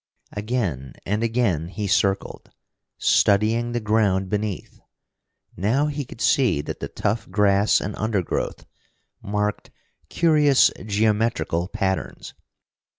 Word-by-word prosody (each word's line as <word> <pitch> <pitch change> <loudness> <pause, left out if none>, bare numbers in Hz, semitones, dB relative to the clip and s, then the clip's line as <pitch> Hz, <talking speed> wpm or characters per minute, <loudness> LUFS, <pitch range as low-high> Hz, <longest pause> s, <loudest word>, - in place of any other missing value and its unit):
Again 105 - -3
and 105 +2 -1
again 115 -9 0
he 105 +3 -5
circled, 100 0 0 0.5
studying 110 +4 +2
the 120 - -1
ground 105 -4 +1
beneath. 105 -2 -3 0.8
Now 115 - +1
he 145 -1 -3
could 115 - -12
see 120 - +3
that - - -6
the - - -4
tough 105 +1 -2
grass 100 +1 +3
and 100 +2 -5
undergrowth 105 -5 -2 0.6
marked 105 0 -2 0.4
curious 150 -5 +4 0.2
geometrical 105 -4 0
patterns. 95 -2 -3
105 Hz, 105 wpm, -23 LUFS, 100-115 Hz, 0.8 s, curious